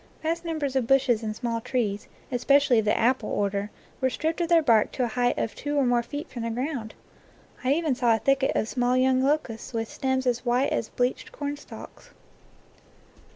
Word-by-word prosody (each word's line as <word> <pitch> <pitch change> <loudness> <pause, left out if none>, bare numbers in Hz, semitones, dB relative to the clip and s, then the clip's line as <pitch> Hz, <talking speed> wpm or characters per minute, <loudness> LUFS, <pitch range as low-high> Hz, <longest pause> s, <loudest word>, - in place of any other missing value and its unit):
Vast 330 +2 -1
num 330 -2 -3
bers 280 -3 -2
of 255 -3 +1
bushes 260 -4 +3
and 215 -1 -4
small 230 -1 -2
trees, 215 -5 -2 0.2
especially 265 0 +4
of 220 - -1
the 210 - +2
apple 240 -1 +1
order, 200 0 -1 0.3
were 260 - +3
stripped 320 +6 -2
of 340 - -1
their 335 -2 +5
bark 230 -6 +4
to 255 - -1
a - - +1
height 245 +1 0
of 225 - -2
two 290 0 -4
or 280 - +3
more 245 -1 +3
feet 290 +5 -6
from 240 - -7
the 230 - -2
ground. 245 -1 -4 0.7
I 260 +2 +3
even 315 -2 +1
saw 240 -2 +3
a - - 0
thicket 270 +3 +1
of 215 - 0
small 245 +1 +1
young 260 0 +3
locusts 265 -5 -1
with 225 -1 -2
stems 260 +1 -1
as 245 -1 0
white 250 +3 +1
as 220 - -2
bleached 250 +1 -2
cornstalks. 290 0 -8
255 Hz, 200 wpm, -26 LUFS, 230-280 Hz, 0.7 s, their